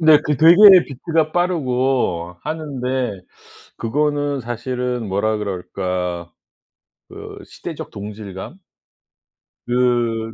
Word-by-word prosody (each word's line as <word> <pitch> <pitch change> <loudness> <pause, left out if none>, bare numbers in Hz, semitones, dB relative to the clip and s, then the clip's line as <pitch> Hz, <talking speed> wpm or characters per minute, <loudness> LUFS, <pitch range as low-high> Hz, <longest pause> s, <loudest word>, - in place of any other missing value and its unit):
네 155 -2 +7
그 150 -2 0
되게 165 +4 +7 0.3
비트가 155 +3 -1
빠르고 130 - 0
하는데 130 - -3 0.6
그거는 145 +3 -1
사실은 125 0 -3
뭐라 105 +3 0
그럴까 90 -3 -4 0.8
그 - - -10
시대적 - - -8
동질감? 100 - -8 1.1
그 120 -2 0
125 Hz, 185 characters per minute, -20 LUFS, 105-145 Hz, 1.1 s, 네